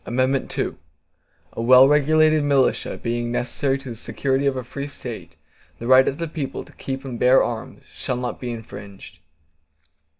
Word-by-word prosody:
II 130 +2 -1 0.8
A - - -4
well 130 +3 +7
regulated 155 +1 +4
militia, 140 -2 +1
being 120 0 -3
necessary 135 +3 -1
to 135 -2 -9
the - - -7
security 135 +4 -1
of 135 -1 0
a 130 - -3
free 140 +4 -6
State, 125 -5 -8 0.4
the 115 - -8
right 130 +1 +6
of 135 - -1
the 165 0 -3
people 150 -4 -5
to - - -18
keep 135 0 -6
and 125 -3 -6
bear 130 +1 +5
arms, 115 -2 -6
shall 125 - -4
not 125 0 -4
be 125 - -5
infringed. 100 -6 -9
130 Hz, 165 wpm, -22 LUFS, 120-140 Hz, 0.8 s, well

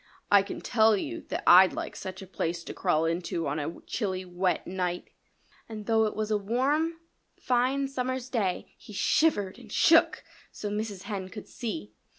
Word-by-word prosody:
"I 200 -1 +8
can 195 - -6
tell 220 -2 +4
you - - -4
that - - -3
I'd 185 +1 +8
like - - -5
such 190 0 -7
a - - -9
place 170 -2 -3
to - - -7
crawl 155 +1 +1
into 165 0 -2
on 145 +2 -1
a 155 +3 -5
chilly, 185 -4 -3
wet 180 0 -1
night." 180 -1 -3 0.6
And 215 -2 -7
though 225 0 +3
it 215 - -2
was 215 0 -2
a 210 - +2
warm, 275 +10 0 0.4
fine 255 +3 +1
summer's 255 -1 -3
day 210 -8 -2
he 210 - -12
shivered 205 -4 +1
and - - -14
shook, - - +4 0.3
so 205 - -5
Mrs. 210 -2 -4
Hen 195 -4 -5
could 210 +1 -9
see. 105 - -5
205 Hz, 175 wpm, -28 LUFS, 185-235 Hz, 0.6 s, I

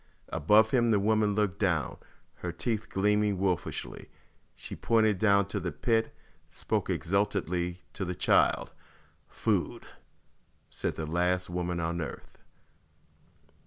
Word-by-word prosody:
Above 105 +8 +4
him 120 -3 +3
the 105 -3 +4
woman 105 0 +2
looked 100 -2 0
down, 85 - 0 0.4
her 90 - -4
teeth 105 +6 -2
gleaming 105 0 +2
wolfishly. 90 -2 -2 0.5
She - - -6
pointed 110 -4 +2
down 100 -2 +5
into 100 +1 -4
the 90 -2 -3
pit; 110 +10 0 0.4
spoke - - -2
exultantly 90 -2 -1
to 95 - -3
the 90 -1 -3
child. - - +2 0.6
"Food!" - - -1 0.9
said - - -3
the 80 - -4
last 90 +3 0
woman 90 0 -2
on 85 +1 -2
earth. 75 - -8
95 Hz, 125 wpm, -29 LUFS, 85-105 Hz, 0.9 s, down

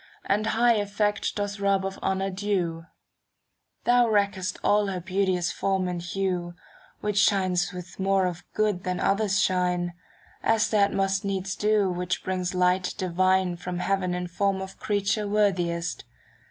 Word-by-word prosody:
35 - - -4
And 215 +1 -2
high 235 +2 +4
effect 205 0 -1
dost 205 0 -3
rob 200 -1 +1
of 195 0 -5
honour 190 0 -1
due; 185 -4 -2 1.0
Thou 245 -1 +4
wreckest 200 -3 0
all 205 0 +3
her 190 -2 -2
beauteous 185 -1 0
form 190 -1 0
and 175 -1 -3
hue. 180 -1 -2 0.5
Which 210 -1 0
shines 185 -3 +2
with 180 0 -9
more 195 0 +2
of 175 -1 -3
good 210 -4 +1
than 180 -1 -2
others 200 -1 +1
shine. 180 -2 +1 0.5
As 225 -1 +2
that 200 -2 +3
must 195 0 0
needs 195 -1 -2
do 210 -2 +2
which 180 +1 -2
brings 185 -1 -2
light 180 0 +2
divine 185 -1 +1
From 180 0 -5
heaven 185 -1 0
in 180 0 -3
form 195 +2 0
of 190 0 -8
creature 205 0 0
worthiest. 180 -5 0
190 Hz, 155 wpm, -26 LUFS, 180-200 Hz, 1.0 s, high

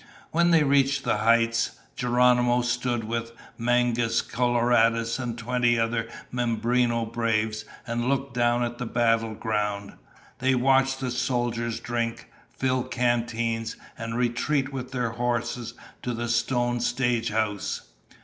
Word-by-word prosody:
When 170 +1 +3
they 165 -3 +5
reached 140 -1 +3
the - - +1
heights, 115 +1 +2 0.2
Geronimo 125 0 +3
stood 120 -1 -1
with 115 +1 -3 0.2
Mangus 120 -1 +1
Coloradus 120 -1 +2
and 120 -2 -3
twenty 120 0 +1
other 115 0 0 0.2
Mimbreno 120 0 +1
braves 110 -2 -1 0.2
and 120 0 -1
looked 135 -1 -1
down 120 0 +2
on 120 0 -3
the 125 - -3
battle 115 -2 +1
ground. 105 -2 -2 0.5
They 130 +1 +2
watched 135 +1 +3
the 130 -1 -2
soldiers 120 -2 -1
drink, 115 -1 -3 0.2
fill 130 -1 0
canteens, 115 -2 -1 0.2
and 115 0 -4
retreat 135 +3 0
with 130 -1 -5
their 125 -3 -1
horses 120 0 -2 0.3
to 125 -1 -3
the 120 0 -3
stone 120 +1 +1
stagehouse. 115 -4 0
120 Hz, 125 wpm, -26 LUFS, 115-125 Hz, 0.5 s, they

